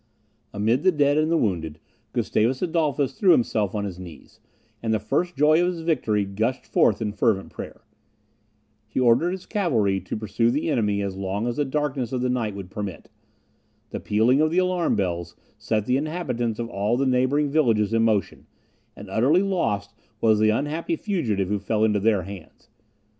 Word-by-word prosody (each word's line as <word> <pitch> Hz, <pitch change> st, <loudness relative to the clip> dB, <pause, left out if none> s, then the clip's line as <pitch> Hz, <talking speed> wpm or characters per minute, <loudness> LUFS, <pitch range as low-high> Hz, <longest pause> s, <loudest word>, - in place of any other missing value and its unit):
Amid 110 Hz, +5 st, +1 dB
the 185 Hz, +2 st, +4 dB
dead 145 Hz, -2 st, +2 dB
and 155 Hz, +1 st, +1 dB
the 165 Hz, -, +3 dB
wounded, 80 Hz, -, -2 dB, 0.3 s
Gustavus 125 Hz, +7 st, 0 dB
Adolphus 155 Hz, -5 st, 0 dB
threw 190 Hz, -4 st, +6 dB
himself 110 Hz, -, 0 dB
on 100 Hz, -1 st, -1 dB
his 95 Hz, -3 st, -6 dB
knees; 85 Hz, -5 st, -12 dB, 0.4 s
and 115 Hz, -, -1 dB
the 110 Hz, -, +1 dB
first 175 Hz, -, -1 dB
joy 155 Hz, +4 st, +4 dB
of 175 Hz, -, +2 dB
his 165 Hz, -, -7 dB
victory 120 Hz, -11 st, 0 dB
gushed 110 Hz, +6 st, -2 dB
forth 105 Hz, 0 st, +2 dB
in 105 Hz, -, -2 dB
fervent 105 Hz, -2 st, 0 dB
prayer. -, -, -9 dB, 1.1 s
He 110 Hz, -, -3 dB
ordered 125 Hz, +7 st, +4 dB
his 185 Hz, 0 st, -5 dB
cavalry 115 Hz, -, +1 dB
to -, -, -5 dB
pursue 110 Hz, +2 st, 0 dB
the 150 Hz, +5 st, 0 dB
enemy 105 Hz, -5 st, 0 dB
as 100 Hz, -1 st, -4 dB
long 100 Hz, +3 st, -3 dB
as 120 Hz, -1 st, -2 dB
the 145 Hz, -, +1 dB
darkness 135 Hz, -3 st, -2 dB
of 130 Hz, -1 st, -2 dB
the 125 Hz, -, 0 dB
night 115 Hz, -5 st, -2 dB
would 95 Hz, -2 st, -8 dB
permit. 105 Hz, -3 st, -6 dB, 0.8 s
The -, -, -4 dB
pealing 115 Hz, +7 st, +2 dB
of 155 Hz, -, +3 dB
the 170 Hz, -, -2 dB
alarm 180 Hz, -2 st, +1 dB
bells 85 Hz, -3 st, -2 dB, 0.2 s
set 110 Hz, -2 st, -1 dB
the 125 Hz, +2 st, +2 dB
inhabitants 135 Hz, -8 st, -2 dB
of 120 Hz, -, -3 dB
all 105 Hz, +2 st, -1 dB
the 135 Hz, -, +1 dB
neighbouring 130 Hz, +3 st, +1 dB
villages 115 Hz, -8 st, +2 dB
in 115 Hz, -, +3 dB
motion, 110 Hz, -5 st, 0 dB, 0.5 s
and -, -, -10 dB
utterly 145 Hz, -, +3 dB
lost 115 Hz, -, -1 dB, 0.3 s
was 110 Hz, -2 st, +3 dB
the 110 Hz, 0 st, +4 dB
unhappy 150 Hz, -, -1 dB
fugitive 125 Hz, -, -1 dB
who 105 Hz, 0 st, 0 dB
fell 105 Hz, +2 st, 0 dB
into 105 Hz, -2 st, +2 dB
their 105 Hz, -2 st, +2 dB
hands. 95 Hz, -2 st, -11 dB
115 Hz, 185 wpm, -24 LUFS, 105-150 Hz, 1.1 s, threw